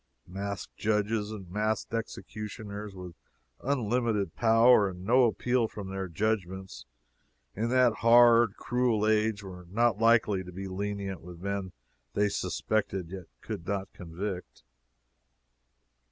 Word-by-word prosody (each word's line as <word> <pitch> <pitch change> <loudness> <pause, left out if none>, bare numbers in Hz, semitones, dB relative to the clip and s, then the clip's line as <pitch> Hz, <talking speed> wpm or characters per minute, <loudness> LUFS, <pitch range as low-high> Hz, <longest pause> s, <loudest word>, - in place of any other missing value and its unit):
Masked 100 +2 -6
judges 105 0 0
and 105 -4 -7
masked 110 +3 -1
executioners, 105 -2 -6
with 90 -2 -8 0.5
unlimited 115 - 0
power, 115 -2 +5
and 90 0 -9
no 125 +4 +5
appeal 120 +1 +1
from 100 -3 -8
their 95 -1 -3
judgements, 95 - -3 0.7
in 115 +3 -1
that 125 -2 +4
hard, 115 -2 +6
cruel 120 -4 +1
age, 110 -1 +1
were 90 -2 -10
not 115 +1 +2
likely 115 -4 +3
to 90 - -10
be 95 +2 -6
lenient 100 -1 -4
with 85 0 -11
men 100 0 -3 0.4
they 105 0 +3
suspected 100 -4 -2
yet 95 -2 -7 0.2
could 85 - -6
not 100 -1 -3
convict. 90 +2 -6
105 Hz, 125 wpm, -29 LUFS, 95-115 Hz, 0.7 s, hard